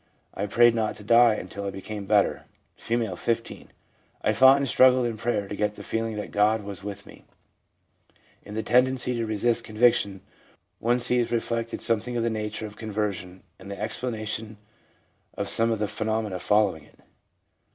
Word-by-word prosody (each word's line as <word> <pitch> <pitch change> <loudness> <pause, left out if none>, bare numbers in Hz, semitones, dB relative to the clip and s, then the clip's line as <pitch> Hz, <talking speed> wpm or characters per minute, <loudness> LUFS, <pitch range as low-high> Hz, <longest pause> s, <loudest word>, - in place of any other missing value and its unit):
I 100 - -3
prayed 120 +3 +5
not 110 -2 -1
to 105 - -12
die 115 +1 +5
until 100 0 -7
I 100 - -2
became 100 +1 -7
better/ 105 -1 +2 0.3
F., 115 -5 -2
15. 115 0 -3 0.3
' - - -39
I 110 - +2
fought 130 +5 +7
and 140 0 -1
struggled 130 0 +5
in 115 -2 -2
prayer 105 -2 -2
to 105 - -5
get 105 0 -1
the - - -10
feeling 115 -1 -2
that 105 - -6
God 105 +1 +2
was 100 -1 -7
with 100 0 -7
me/ - - -15 1.2
In 105 - -10
the 110 - -2
tendency 125 +1 +2
to 115 -1 -2
resist 115 +2 0
conviction, 110 -3 +2 0.6
one 120 +2 +1
sees 120 -1 +1
re 120 - +3
flected 115 0 -3
something 115 +1 -1
of 115 - 0
the 115 - 0
nature 110 0 -4
of 105 0 -10
conversion, 100 -4 -4 0.2
and 95 +1 -11
the 100 -1 -7
explanation 110 -2 -4 0.8
of - - -2
some 115 0 +3
of 115 - 0
the 105 0 -1
phenomena 110 -2 -2
following 105 -4 +1
it. - - -23
110 Hz, 180 wpm, -25 LUFS, 105-115 Hz, 1.2 s, fought